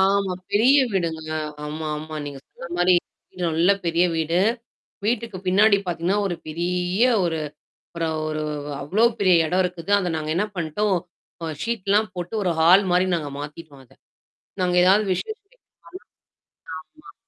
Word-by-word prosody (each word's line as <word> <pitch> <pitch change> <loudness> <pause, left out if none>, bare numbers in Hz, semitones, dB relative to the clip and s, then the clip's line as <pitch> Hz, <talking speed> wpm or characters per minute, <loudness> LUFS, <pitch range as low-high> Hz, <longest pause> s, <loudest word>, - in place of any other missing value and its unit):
ஆமா, 195 0 +2 0.2
பெரிய 245 +7 +5 0.2
வீடுங்க. 160 -4 -2 0.3
ஆமா, 155 +1 -5
ஆமா. 155 +1 -7
நீங்க 140 -1 -7
சொன்ன 170 - -11
மாரி, 180 +1 +4 0.4
வீடு 180 - -8
நல்ல 165 +4 +3
பெரிய 170 +1 +3
வீடு. 165 +2 +1 0.7
வீட்டுக்கு 225 -3 -1
பின்னாடி 200 +3 +5
பாத்தீங்கன்னா, 175 +3 0
ஒரு 180 - -1
பெரிய 180 +5 -1 0.2
ஒரு 165 -2 -1 0.5
அப்பறம் 165 -2 -2
ஒரு 155 0 -3 0.4
அவ்ளோ 195 +11 +2 0.2
பெரிய 185 -3 +5
இடம் 180 +3 +2
இருக்குது. 180 +1 -5
அத 180 -3 -1
நாங்க 155 -1 -3
என்ன 195 - +2
பண்ணிட்டோம். 180 +4 0 0.5
அ, - - -3 0.2
ஷீட்லாம் 215 -2 0
போட்டு, 175 +3 -5
ஒரு 180 - +1
ஹால் 180 +5 +6
மாரி 180 +1 +3
நாங்க 150 -3 -5
மாத்திட்டுடோம் 145 -1 -9
அத. 120 - -23 0.7
நாங்க 180 -1 +1
ஏதாவது 195 +4 +5
விசேஷம் 415 - -6
வெக்கப்போன, - - -32 1.4
ஆமா - - -13
180 Hz, 145 wpm, -23 LUFS, 160-195 Hz, 1.4 s, ஹால்